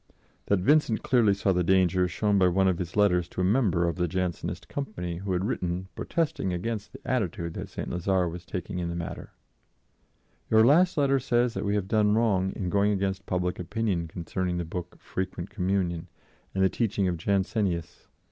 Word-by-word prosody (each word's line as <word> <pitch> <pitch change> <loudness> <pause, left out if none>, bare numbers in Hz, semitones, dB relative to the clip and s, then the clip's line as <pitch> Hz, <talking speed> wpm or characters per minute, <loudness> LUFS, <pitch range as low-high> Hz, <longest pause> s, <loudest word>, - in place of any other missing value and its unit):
That 100 -3 +2
Vincent 135 -1 +3
clearly 115 -6 +4
saw 100 0 +1
the 90 0 +1
danger 90 0 +3
is - - -2
shown 100 +2 +1
by 90 - +5
one 95 +2 +3
of 90 -3 +1
his 90 -2 -5
letters 90 -4 +3
to - - -4
a - - +1
member 95 -5 +2
of 85 - -2
the 90 -1 +1
Jansenist 90 0 -3
company 90 -11 -4
who 95 +2 -4
had 90 +2 0
written 90 -4 -2
protesting 160 - -1
against 105 +4 -3
the - - -10
attitude 85 -9 -1
that - - -6
St. - - -5
Lazare 90 +1 +1
was 85 +1 -6
taking 90 -1 -5
in 85 -1 -2
the 85 - -4
matter: 85 -1 -6 1.2
"Your 110 0 +6
last 170 +8 +4
letter 140 -2 +3
says 120 -2 +1
that 95 +2 -3
we 100 +1 +1
have 100 -2 -1
done 105 0 +3
wrong 100 -5 +2
in 90 -3 -3
going 100 +2 +3
against 95 -1 -2
public 90 -1 -1
opinion 95 -2 -1
concerning 90 +2 -3
the 85 - -2
book 90 +1 -6
Frequent 95 -1 -5
Communion 90 -3 -1 0.5
and 95 - +2
the - - +6
teaching 100 -4 0
of 90 -2 -1
Jansenius. 95 -2 -1
95 Hz, 195 wpm, -27 LUFS, 90-105 Hz, 1.2 s, Your